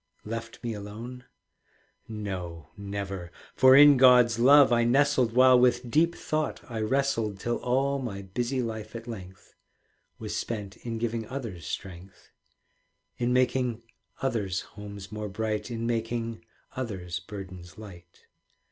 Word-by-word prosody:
Left 115 +2 -6
me 115 -1 -2
alone? 115 +5 -8 0.8
No, 95 -7 -6
never. 100 -3 -5 0.2
For 130 0 +7
in 145 0 +9
God's 125 -3 +6
love 135 +1 +7
I 120 0 +3
nestled, 130 -1 +3
While 130 0 +6
with 125 -1 +2
deep 165 +4 +3
thought 155 0 -2
I 115 -4 -5
wrestled, 115 -4 0
Till 120 +4 -1
all 135 +3 0
my 100 -7 -5
busy 120 +7 -2
life 110 -1 -6
at 115 +1 -7
length 95 -5 -10 0.6
Was - - -5
spent 105 -4 -4
in 115 -1 -5
giving 115 -1 -2
others 115 - -6
strength, 95 0 -8 0.9
In 120 0 +1
making 125 -2 +1 0.4
others' 105 -8 -1
homes 100 -1 -9
more 105 -1 -5
bright, 105 +2 -3
In 115 -1 -4
making 115 -1 -2 0.3
others' 95 -7 -4
burdens 95 -2 -10
light. 90 -6 -13
115 Hz, 130 wpm, -27 LUFS, 100-125 Hz, 0.9 s, in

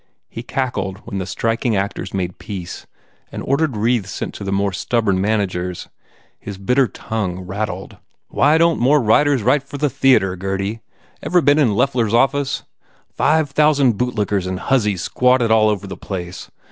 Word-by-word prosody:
He 115 - -6
cackled 115 -7 -3
when 100 -4 -4
the 95 - -4
striking 115 +3 -1
actors 100 +1 -3
made 90 -2 -3
peace 95 -4 -7 0.4
and - - -6
ordered 140 -3 0
wreaths 110 -2 0
sent - - -5
to - - -8
the 100 - -3
more 100 0 0
stubborn 105 -3 0
managers. 95 -4 -2 0.5
His 100 -2 -8
bitter 125 +7 +2
tongue 100 -7 -4
rattled. 95 0 -4
u - - -17 0.3
Why 150 +3 +3
don 165 0 +3
t - - -2
more 145 +4 +5
writers 135 +2 +3
write 130 +5 +3
for 140 +1 -9
the 145 -1 0
theatre, 125 -8 +3
Gurdy? 95 +3 -3 0.4
Ever 180 - +2
been 145 -1 +3
in 145 - +4
Billy 105 -2 -1
Loeffler 125 -3 +2
s 105 - -4
office? 135 +3 +1 0.5
Five 155 -2 +2
thousand 140 -7 +3
bootlickers 105 -6 -1
and 95 0 -3
hussies 105 -9 +1
squatted 125 -2 +2
all 110 -1 +5
over 105 -2 -2
the 95 -1 -7
place. 90 -2 -7
110 Hz, 175 wpm, -19 LUFS, 95-135 Hz, 0.5 s, more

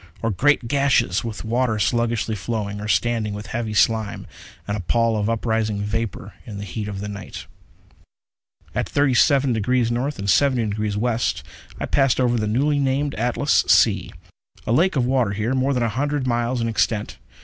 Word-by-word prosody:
Or 115 - +1
great 130 +4 +2
gashes 140 -8 +2
with 115 -2 -6
water 115 0 0
sluggishly 115 0 0
flowing, 105 0 -4
or 105 - -5
standing 110 -2 0
with 105 +1 -7
a - - -11
heavy 110 -2 -3
slime, 110 -2 +1 0.4
and 100 - -1
a - - -3
pall 115 +5 +1
of 105 0 0
uprising 110 -2 -1
vapor 115 0 -4
in 105 - -8
the 100 - -5
heat 105 +2 -5
of 100 -2 -5
the 105 - -4
night. 100 -2 -8 1.3
At - - -2
37°N. 140 0 +3
and - - -1 1.2
70°W., 110 +3 -1 0.4
I - - -2
passed 135 -3 +2
over 120 -2 +2
the 110 - -1
newly 145 +7 +1
named 140 +1 0
Atlas 125 +5 +1
Sea. - - +3 0.5
A - - -1
lake 170 +8 +3
of 130 -3 +2
water 125 -5 +1
here, 110 +5 -1
more 135 +1 +1
than 125 -3 0
a - - +2
hundred 140 +4 -1
miles 120 0 0
in 115 - 0
extent. 110 -1 -1
115 Hz, 170 wpm, -22 LUFS, 105-130 Hz, 1.3 s, 37°N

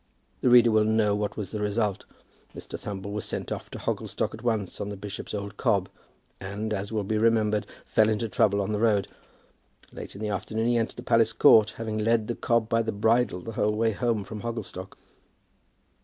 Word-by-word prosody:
The 125 - +3
reader 120 -1 +7
will 110 0 +4
know 110 -1 +2
what 105 0 -3
was 100 -4 -5
the 110 - -4
result. 105 -1 -1 0.5
Mr. - - -8
Thumble 100 0 -6
was 105 -1 -3
sent - - -4
off - - -5
to - - -7
Hogglestock - - -2
at 110 - -9
once 110 -5 -2
on 100 - -3
the 100 - -6
bishop's 100 +1 -7
old 100 -1 -6
cob, 100 -7 +1 0.5
and, 105 +3 -4
as 100 +1 -3
will 110 -2 -1
be 105 +2 -1
remembered, 110 -2 +2 0.2
fell 110 0 +3
into 110 +1 0
trouble 100 -1 +2
on 100 - -2
the 105 - -1
road. 105 -3 +2 0.9
Late - - -8
in 100 - -9
the 105 - -2
afternoon 110 +3 -2
he 120 - +3
entered 115 -1 -1
the - - -8
palace 115 -1 +3
yard, 110 -1 +7
having 110 -1 -3
led 110 0 +2
the 120 - -1
cob 115 -1 +1
by 115 0 +2
the 110 0 -2
bridle 110 -2 +1
the 115 - -7
whole 105 -1 0
way 115 +1 +2
home 115 -1 -1
from 105 +2 -8
Hogglestock. 105 -5 -6
110 Hz, 205 wpm, -27 LUFS, 100-115 Hz, 0.9 s, reader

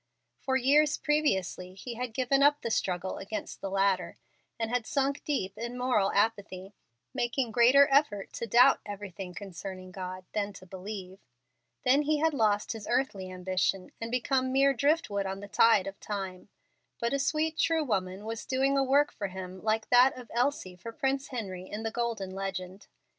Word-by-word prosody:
For 265 - -1
years 290 +4 +4
previously 190 - 0
he 235 +5 -7
had 240 -1 -5
given 265 +2 +2
up 290 +1 +5
the 230 - -3
struggle 185 -2 -1
against 205 +3 -6
the 195 - -3
latter, 190 -3 +1 0.4
and 225 0 -2
had 245 -2 -1
sunk 275 0 0
deep 195 -10 -2
in 235 +2 -4
moral 245 -6 +2
apathy, 200 -2 -1 0.4
making 240 0 -1
greater 250 +5 +6
effort 270 -9 +2
to 235 - -4
doubt 245 +5 +6
everything 195 -3 -7
concerning 185 -1 -8
God 185 0 -6
than 205 -1 -1
to 185 - -12
believe. 190 0 -8 0.7
Then 270 +3 +5
he 300 +1 +1
had 320 +1 +2
lost 210 -5 +1
even 225 - -6
his 205 - -10
earthly 210 -7 0
ambition, 185 +1 -1
and 230 - -3
become 255 +1 0
mere 275 +1 +4
driftwood 270 -8 +1
on 190 0 -4
the 205 - -8
tide 210 -1 +4
of 195 0 -7
time. 195 -2 -5 0.5
But 235 +3 -1
a 280 - +1
sweet, 310 +3 0
true 325 -1 +2
woman 195 -5 -2
was 225 0 -5
doing 270 +1 +2
a - - +3
work 280 +2 +3
for 200 - -4
him 185 0 -8
like 220 0 0
that 250 +2 +6
of 245 -2 -11
Elsie 240 -7 0
for 230 +6 -8
Prince 270 +3 -1
Henry 190 -7 -6
in 210 +2 -5
the 225 - -2
Golden 225 -5 -2
Legend. 190 0 -5
220 Hz, 180 wpm, -29 LUFS, 190-265 Hz, 0.7 s, greater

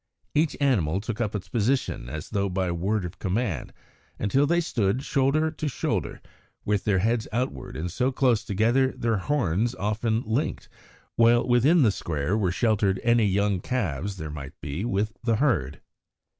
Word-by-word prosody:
Each 155 +1 +1
animal 100 - +2
took 110 +2 -4
up 105 -2 -1
its 95 -2 -5
position 115 - -1
as 75 +3 -7
though 100 -1 0
by 90 -1 -1
word 95 +3 -1
of 85 - -8
command, 95 - -2 0.5
until 135 +8 +2
they 170 +3 +3
stood, 120 - 0
shoulder 150 +3 +1
to 155 -1 -4
shoulder, 135 - -2 0.4
with 105 -1 0
their 100 -3 +2
heads 110 +4 +1
outward 125 +4 -3
and 85 +2 -3
so 125 +8 0
close 125 -4 +2
together 115 +6 +2
that - - -9
their 115 -2 +1
horns 115 - 0
often 110 +4 -1
linked, 125 +8 -2 0.5
while 120 +1 +4
within 135 +7 +4
the 110 - +4
square 80 0 -2
were 100 -5 +1
sheltered 100 -2 +1
any 120 -2 +4
young 100 0 +1
calves 95 - -2
there 80 -3 -5
might 75 0 -8
be 75 +6 -4
with 105 0 -1
the 115 -1 +2
herd. 105 - 0
110 Hz, 170 wpm, -26 LUFS, 95-125 Hz, 0.5 s, while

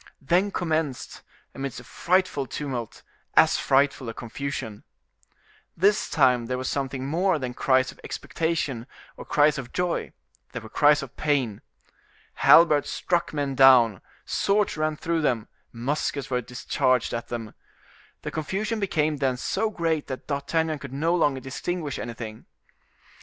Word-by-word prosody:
Then 175 +8 +2
commenced, 160 -8 -2 0.3
amidst 135 -3 -5
a - - -12
frightful 175 0 0
tumult, 125 -5 -5 0.3
as - - +5
frightful 135 -2 +2
a 115 - -7
confusion. 120 -3 -5 0.9
This 200 +5 +3
time 125 -5 +3
there 125 +1 -2
was 130 0 -3
something 135 -1 -2
more 175 +5 +1
than 130 -3 -4
cries 130 0 +2
of - - -19
expectation 150 -7 -2 0.3
or - - -10
cries 150 0 +3
of 125 -2 -8
joy, 180 -1 -1 0.4
there 125 - -4
were 110 - -10
cries 145 +2 +4
of 135 0 -10
pain. 135 -9 0 0.7
Halberds 155 -3 +6
struck 175 -1 -1
men 145 -2 -2
down, 125 -7 +6 0.2
swords 205 +1 +1
ran 155 0 0
through 165 +1 -1
them, 120 -7 0 0.2
muskets 140 +3 -2
were 125 -1 +1
discharged 125 +1 0
at 115 0 -4
them. 115 -3 -6 0.7
The - - -4
confusion 205 +8 -2
became 155 -6 0
then 135 -3 0
so 215 - -1
great 165 -6 -1
that 130 - -6
D'Artagnan 155 +2 -1
could 140 -2 -9
no 160 +5 +1
longer 145 -6 +1
distinguish 150 +3 -4
anything. 115 -2 -7
140 Hz, 140 wpm, -25 LUFS, 125-160 Hz, 0.9 s, Halberds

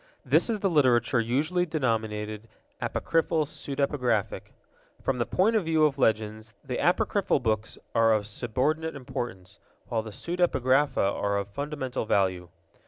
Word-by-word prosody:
This - - +4
is 215 -3 -1
the 195 - +2
literature 130 -5 +3
usually 145 +10 +1
denominated 110 -8 -2 0.3
apocryphal 165 -1 0
pseudepigraphic. 140 -7 -2 0.5
From 130 -2 -1
the 120 - 0
point 215 +5 +2
of 210 -6 +2
view 160 -1 +3
of 140 -2 0
legends, 110 -1 0
the - - -3
apocryphal - - +2
books 110 -2 -2 0.2
are 115 -1 +4
of 105 -2 +2
subordinate 135 +9 -1
importance, 105 -7 -6 0.3
while 115 -2 0
the 110 - -8
pseudepigrapha 145 - +1
are 100 +1 0
of 100 0 -3
fundamental 135 -1 -4
value. 95 -4 +1
125 Hz, 135 wpm, -27 LUFS, 110-150 Hz, 0.5 s, This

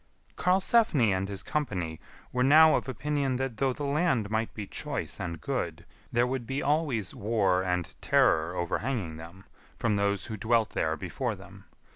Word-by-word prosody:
[Karlsefni 185 - +3
and 95 +1 -2
his 100 -2 -4
company] 90 - -2 0.3
were 125 - +2
now 155 +4 +7
of - - -2
opinion 140 +1 -1
that 130 -3 -3
though 135 +1 +2
the 145 - -5
land 140 -7 +1
might 110 +1 0
be 105 - -5
choice - - -4
and 85 -2 -4
good, - - -3 0.3
there 120 +1 +3
would 125 -2 -3
be 135 +1 -2
always 140 - 0
war 100 -4 +1
and 90 -2 -2
terror 80 +3 +3
overhanging 90 -1 -2
them, 85 +4 -11 0.3
from 105 -3 +1
those 100 -1 0
who 110 - -5
dwelt 110 +1 +1
there 80 0 -1
before - - -3
them. - - -14
115 Hz, 165 wpm, -28 LUFS, 95-135 Hz, 0.3 s, now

